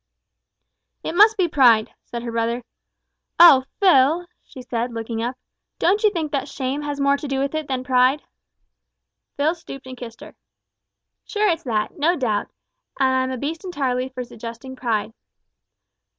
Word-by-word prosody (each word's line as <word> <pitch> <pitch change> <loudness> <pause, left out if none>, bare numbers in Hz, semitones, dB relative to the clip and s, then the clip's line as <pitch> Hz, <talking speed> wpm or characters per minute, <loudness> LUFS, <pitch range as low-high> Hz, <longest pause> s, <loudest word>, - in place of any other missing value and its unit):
"It - - -3
must 425 +4 +6
be 370 -3 +2
pride," 245 -8 +4
said 235 0 -6
her 235 - -4
brother. 230 +1 -1 0.8
"Oh! 275 -7 +8
Phil," 335 -2 +4 0.2
she 255 - -12
said, 240 0 -3
looking 225 0 -4
up, 245 +2 -3 0.4
"don't 400 +4 +2
you 425 - +6
think 325 -7 -3
that 275 -1 -2
shame 275 0 -3
has 290 -1 -4
more 280 0 +3
to 295 - -6
do 270 -1 -2
with 275 +2 -1
it 310 -2 -3
than 260 -1 -2
pride?" 255 +2 +3 1.1
Phil 300 +3 +2
stooped 275 -6 -11
and 260 0 -8
kissed 235 -2 -10
her. - - -11 0.9
"Sure 425 0 0
it's 335 -4 0
that, 220 +6 -2
no 335 +4 +3
doubt, 220 -9 -1 0.5
and 260 -1 +3
I'm 260 0 +1
a 260 - -3
beast 310 +7 -4
entirely 265 -8 -2
for 255 -1 -6
suggesting 235 +2 -9
pride." 225 -4 -2
265 Hz, 165 wpm, -22 LUFS, 245-310 Hz, 1.1 s, Oh